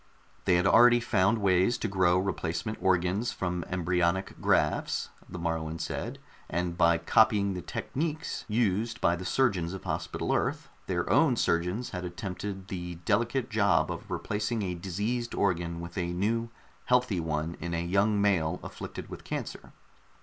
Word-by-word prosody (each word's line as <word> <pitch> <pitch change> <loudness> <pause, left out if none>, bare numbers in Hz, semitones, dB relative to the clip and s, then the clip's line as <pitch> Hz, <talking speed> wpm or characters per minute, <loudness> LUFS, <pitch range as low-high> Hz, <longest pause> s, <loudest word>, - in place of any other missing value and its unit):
They 90 - +4
had 90 +1 +2
already 120 +4 +7
found 110 -2 +2
ways 95 +2 +3
to - - -2
grow 90 -3 +3
replacement 95 +1 -2
organs 95 +5 +1
from 90 -1 -2
embryonic 90 +1 0
grafts, - - +1 0.2
the - - -7
Moruan 80 -1 -2
said, - - -4 0.3
and 85 +1 -1
by 85 -1 +4
copying 100 +2 +3
the 90 - -4
techniques 155 - -3
used 115 +1 0
by 85 - +3
the 90 +1 -7
surgeons 95 -7 +1
of 95 - -7
Hospital - - -2
Earth, - - -1 0.2
their 90 -2 -1
own 130 - +4
surgeons 90 +4 0
had 90 -1 -4
attempted 95 +2 -5
the 90 -2 -5
delicate 120 +5 +1
job 100 -2 +3
of - - -7
replacing 105 +1 -2
a 90 -2 -2
diseased 105 +7 -3
organ 85 -3 0
with 85 +2 -6
a 85 0 -1
new, 115 +5 0 0.4
healthy 125 -6 +2
one 80 0 -2
in 85 0 -3
a 85 +1 -2
young 100 +4 +2
male 90 -5 +2
afflicted - - -7
with - - -9
cancer. - - -5
95 Hz, 155 wpm, -29 LUFS, 85-110 Hz, 0.4 s, already